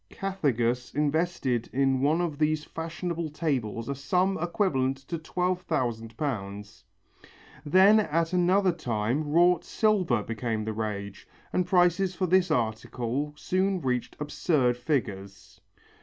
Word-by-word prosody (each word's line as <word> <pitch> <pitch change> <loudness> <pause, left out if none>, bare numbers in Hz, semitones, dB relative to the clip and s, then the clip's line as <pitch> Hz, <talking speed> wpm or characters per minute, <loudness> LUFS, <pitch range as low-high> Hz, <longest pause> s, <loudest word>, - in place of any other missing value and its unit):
Cathegus 125 - -1
invested 150 -5 0
in 135 -1 +1
one 155 +5 +2
of 155 -4 -3
these 155 0 +1
fashionable 165 0 -4
tables 130 -8 -2
a 140 - -1
sum 180 +8 +1
equivalent 155 -7 0
to 135 +5 -6
twelve 180 +3 -1
thousand 115 -9 -2
pounds. 100 - -5 0.8
Then 190 +8 +6
at 165 -3 0
another 185 +2 +3
time 125 -1 -2
wrought 175 +1 +4
silver 185 - +1
becomes 115 -1 -3
the 110 - -2
rage, 100 -3 -5 0.3
and 180 - +1
prices 180 0 +3
for 185 - 0
this 185 +1 +3
article 120 +4 -2
soon 190 +2 0
reached 125 -5 -2
absurd 145 -4 +1
figures. 100 - -4
150 Hz, 125 wpm, -27 LUFS, 120-175 Hz, 0.8 s, Then